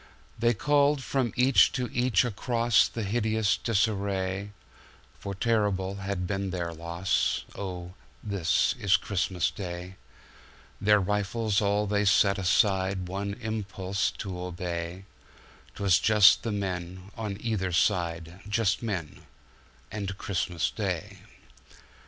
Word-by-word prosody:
They 120 +1 +3
called 145 +3 +2
from 130 -4 0
each 130 +1 +5
to 125 -2 -1
each 120 -4 +3
acrossThe 115 -1 +1
hideous 110 -1 +1
disarray, 100 -3 -1 0.7
For 100 -1 -5
terrible 100 -3 0
has 100 0 -3
been 95 +2 -2
their 85 -2 -3
loss:"Oh, 90 +1 -2 0.3
this 100 -6 +1
is 100 0 +4
Christmas 95 -3 -1
Day!"Their 95 +2 -4
rifles 105 +2 0
all 105 +1 +1
they 105 0 0
set 100 0 +4
aside, 95 -1 +1
One 100 +2 -3
impulse 100 -3 -2
to 95 -3 -5
obey;'Twas 90 +1 -4
just 105 0 +6
the 115 - -3
men 95 -1 -4
on 105 -3 -4
either 105 -5 -2
side, 85 -1 0
Just 105 -2 +1
men 95 -10 -5 0.3
— - - -30
and 100 -2 -4
Christmas 90 -4 -1
Day. - - -4
100 Hz, 110 wpm, -28 LUFS, 95-110 Hz, 0.7 s, just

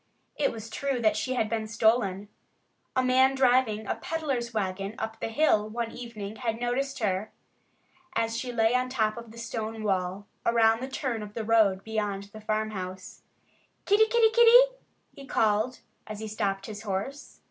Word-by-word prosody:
It 290 - +1
was 225 -1 -8
true 275 -3 -1
that 215 -2 +3
she 255 +4 -2
had 225 -3 +1
been 220 -1 -2
stolen. 215 -3 +1 0.7
A 260 - +3
man 260 +1 +4
driving 250 -4 +3
a - - -1
peddler's 275 -8 -3
wagon 195 -1 -3
up 220 0 -5
the - - -2
hill 220 -4 +2
one 230 +1 -3
evening 220 -3 -7
had 230 -2 -2
noticed 265 +3 -1
her 205 -1 -1 0.8
as 225 0 0
she 250 +1 -3
lay 225 -1 +2
on 250 0 +1
top 220 -4 0
of 235 -1 -9
the 230 - -13
stone 225 -1 -4
wall, 190 0 -1 0.2
around 225 -1 +4
the 260 - -4
turn 255 -4 -3
of 210 0 -9
the 225 - -2
road 210 -4 +3
beyond 210 -3 -2
the 215 - -10
farmhouse. 210 -4 -4 0.6
"Kitty! 425 +2 +5
Kitty! 455 -1 +4
Kitty!" 485 +2 +7 0.4
he 275 - -12
called, 220 +3 +1 0.3
as 215 -1 -6
he 220 - -5
stopped 200 -2 -2
his 210 -1 -7
horse. 215 +8 -5
225 Hz, 170 wpm, -28 LUFS, 210-255 Hz, 0.8 s, Kitty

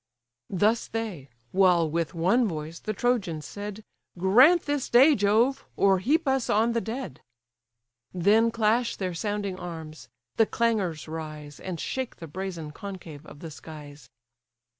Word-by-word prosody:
Thus 210 +5 +1
they: 210 -12 -5 0.2
while 180 -3 +4
with 165 0 -2
one 195 +9 +3
voice 160 -2 -5
the 215 - -4
Trojans 205 -9 -1
said, 205 +1 -7 0.3
"Grant 250 - +6
this 290 -2 -2
day, 265 +6 +7
Jove! 220 +5 +2
or 195 -1 +4
heap 305 - +1
us 265 -2 +1
on 225 +3 +3
the 230 0 0
dead!" 225 - -6 0.9
Then 205 +6 +3
clash 230 +1 +1
their 185 -2 -3
sounding 200 +1 -3
arms; 160 -7 -8 0.3
the 225 - +4
clangours 205 -10 0
rise, 155 -2 -7
And 180 -3 -5
shake 260 +7 -3
the 165 - -9
brazen 170 -1 -6
concave 165 -4 -9
of 145 - -13
the 165 - -7
skies. 145 -4 -11
190 Hz, 140 wpm, -27 LUFS, 160-230 Hz, 0.9 s, day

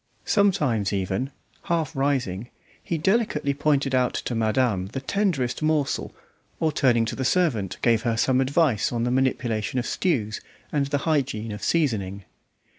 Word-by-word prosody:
Sometimes 150 - +2
even, 95 +6 -1 0.4
half 165 -4 -1
rising, 125 -6 -1 0.3
he 170 - -2
delicately 165 -5 +1
pointed 140 -1 +1
out 125 -1 +2
to - - -3
madame 110 -4 +1
the 125 +7 -5
tenderest 145 -5 -1
morsel, 155 -3 0 0.5
or 160 - +2
turning 120 -5 +3
to - - -4
the 130 - -3
servant, 125 - +1
gave 115 -2 +3
her 115 -1 0
some 130 +3 +3
advice 140 -2 +2
on 120 -1 -1
the 125 - 0
manipulation 125 -3 0
of 125 - 0
stews 115 - -1 0.3
and 140 -2 +1
the 145 - 0
hygiene 135 -8 0
of 105 - -6
seasoning. 100 - 0
130 Hz, 150 wpm, -25 LUFS, 115-150 Hz, 0.5 s, turning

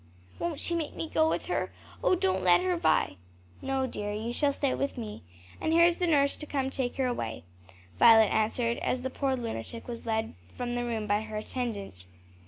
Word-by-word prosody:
"Won't 340 -4 -2
she 345 - -2
make 330 -3 -2
me 325 - -3
go 315 0 +2
with - - -1
her! - - -1 0.3
oh, - - +4
don't 190 - +1
let 175 -1 +6
her, 180 -1 +1
Vi." 160 - +2 0.4
"No, 270 0 0
dear, 205 -5 -4
you 220 +3 -3
shall 285 +2 +2
stay 275 -1 0
with 275 -1 -2
me. 215 -3 -6 0.4
And 320 - 0
here 335 +1 +7
is 345 0 +2
the 355 - +1
nurse 285 -2 +2
come 270 -2 -1
to - - -2
take 250 -2 -1
her 265 - 0
away," 115 - -3 0.6
Violet 225 -2 +8
answered, 230 +2 +1
as 250 0 -1
the 260 - -2
poor 270 0 0
lunatic 230 - -5
was 235 -1 -7
led 220 0 -1 0.2
from 240 -1 -2
the 245 0 -1
room 225 -3 -2
by 205 0 +1
her 220 -1 -6
attendant. 210 - -4
240 Hz, 205 wpm, -29 LUFS, 210-275 Hz, 0.6 s, Violet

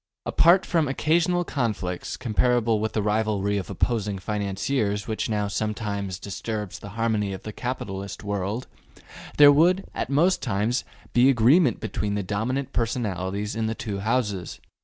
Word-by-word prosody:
Apart 175 +3 +5
from 165 -4 +1
occasional 170 +6 +2
conflicts, 105 - -3
comparable 120 -2 +1
to 110 - -1
the 110 - -1
rivalry 105 -1 0
of 95 - -4
opposing 105 0 -1
financiers 105 +2 -1
which 110 0 -2
now 105 -2 0
sometimes 105 -2 -3
disturbs 105 +1 -5
the 100 - -9
harmony 110 -3 0
of 95 - -8
the 110 - -6
capitalist 100 -7 -5
world, 100 +4 -2 0.7
there 145 -1 +9
would, 175 +6 +4
at - - -3
most 165 +7 +3
times, 110 +2 0 0.3
be 125 +2 +5
agreement 130 +4 +4
between 105 -1 -2
the 100 - -1
dominant 125 +8 -2
personalities 105 -4 -2
in 110 0 -1
the 110 - -2
two 100 -3 -4
Houses. 105 -5 -1
110 Hz, 145 wpm, -25 LUFS, 100-125 Hz, 0.7 s, there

